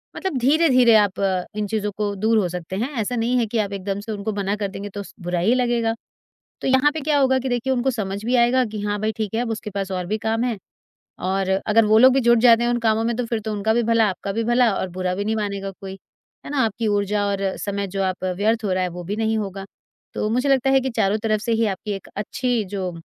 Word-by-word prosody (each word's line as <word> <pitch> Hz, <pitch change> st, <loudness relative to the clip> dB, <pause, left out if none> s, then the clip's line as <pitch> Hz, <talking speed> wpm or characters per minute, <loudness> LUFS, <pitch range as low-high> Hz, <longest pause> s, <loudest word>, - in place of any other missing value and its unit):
मतलब 380 Hz, -9 st, -3 dB
धीरे-धीरे 255 Hz, -4 st, +4 dB
आप 190 Hz, -, -7 dB, 0.4 s
इन 210 Hz, -1 st, -2 dB
चीज़ों 210 Hz, 0 st, -2 dB
को 205 Hz, -1 st, -1 dB
दूर 220 Hz, +3 st, +2 dB
हो 185 Hz, -4 st, +1 dB
सकते 180 Hz, +1 st, -6 dB
हैं, 230 Hz, +7 st, -1 dB
ऐसा 230 Hz, +4 st, -2 dB
नहीं 240 Hz, +2 st, +1 dB
है 235 Hz, -, +2 dB
कि 225 Hz, +2 st, -3 dB
आप 200 Hz, -1 st, -1 dB
एकदम 195 Hz, +1 st, -3 dB
से 220 Hz, +2 st, -6 dB
उनको 210 Hz, +1 st, -3 dB
मना 200 Hz, +1 st, -1 dB
कर 205 Hz, -1 st, -2 dB
देंगे, 200 Hz, +1 st, -7 dB
तो 200 Hz, 0 st, -6 dB
स -, -, -14 dB
बुरा 175 Hz, 0 st, -2 dB
ही 200 Hz, +8 st, +3 dB
लगेगा। 240 Hz, -2 st, +1 dB, 0.7 s
तो -, -, -2 dB
यहाँ 265 Hz, +3 st, +4 dB
पे 315 Hz, -, -3 dB
क्या 295 Hz, 0 st, +1 dB
होगा 265 Hz, -1 st, +3 dB
कि 260 Hz, 0 st, -3 dB
देखिए, 245 Hz, +2 st, 0 dB
उनको 255 Hz, +1 st, +1 dB
समझ 205 Hz, -3 st, -4 dB
भी 245 Hz, +2 st, 0 dB
आएगा 245 Hz, +2 st, +4 dB
कि, 215 Hz, -2 st, -6 dB
"हाँ 205 Hz, 0 st, -1 dB
भाई, 215 Hz, +1 st, 0 dB
ठीक 220 Hz, -1 st, -3 dB
है, 230 Hz, -, +1 dB
अब 240 Hz, -, -3 dB
उसके 215 Hz, -1 st, -4 dB
पास 195 Hz, -1 st, -4 dB
और 180 Hz, -1 st, -3 dB
भी 215 Hz, +4 st, -1 dB
काम 225 Hz, +2 st, 0 dB
हैं।" 235 Hz, -5 st, -2 dB, 0.7 s
और 190 Hz, 0 st, 0 dB, 0.2 s
अगर 215 Hz, +1 st, +4 dB
वो 215 Hz, +1 st, +4 dB
लोग 255 Hz, +1 st, +7 dB
भी 270 Hz, -, +3 dB
जुट 235 Hz, 0 st, +6 dB
जाते 235 Hz, 0 st, +6 dB
हैं 240 Hz, -, +1 dB
उन 240 Hz, -, +1 dB
कामों 225 Hz, -1 st, +1 dB
में, 235 Hz, +1 st, 0 dB
तो 245 Hz, +1 st, -2 dB
फिर 230 Hz, -1 st, -2 dB
तो 220 Hz, 0 st, -5 dB
उनका 210 Hz, +2 st, 0 dB
भी 240 Hz, -, +2 dB
भला, 230 Hz, 0 st, +3 dB
आपका 190 Hz, +2 st, -4 dB
भी 225 Hz, +3 st, -1 dB
भला 240 Hz, 0 st, +3 dB
और 190 Hz, -, -2 dB
बुरा 180 Hz, 0 st, -2 dB
भी 200 Hz, +2 st, -3 dB
नहीं 220 Hz, +1 st, 0 dB
मानेगा 200 Hz, -2 st, -3 dB
कोई। 190 Hz, -1 st, -7 dB, 0.5 s
है -, -, -7 dB
ना? 290 Hz, -, -2 dB
आपकी 225 Hz, +1 st, -2 dB
ऊर्जा 205 Hz, 0 st, 0 dB
और 200 Hz, -1 st, -2 dB, 0.2 s
समय, 200 Hz, -1 st, -3 dB
जो 195 Hz, +1 st, -3 dB
आप 185 Hz, 0 st, -2 dB
व्यर्थ 220 Hz, +2 st, +1 dB
हो 200 Hz, -, -1 dB
रहा 185 Hz, 0 st, 0 dB
है, 180 Hz, -, -1 dB
वो 175 Hz, +1 st, -8 dB
भी 195 Hz, +4 st, -3 dB
नहीं 220 Hz, 0 st, 0 dB
होगा। 195 Hz, -2 st, -4 dB, 0.5 s
तो 210 Hz, -, -1 dB
मुझे 250 Hz, +5 st, +1 dB
लगता 270 Hz, -1 st, +3 dB
है 270 Hz, 0 st, +5 dB
कि 265 Hz, -, -2 dB
चारों 195 Hz, +2 st, +2 dB
तरफ 215 Hz, -1 st, +1 dB
से 230 Hz, -, -2 dB
ही 225 Hz, 0 st, +2 dB
आपकी 210 Hz, +3 st, -7 dB
एक 195 Hz, -, -7 dB
अच्छी 240 Hz, +3 st, -1 dB
जो 185 Hz, -2 st, -2 dB
220 Hz, 270 wpm, -22 LUFS, 200-240 Hz, 0.7 s, लोग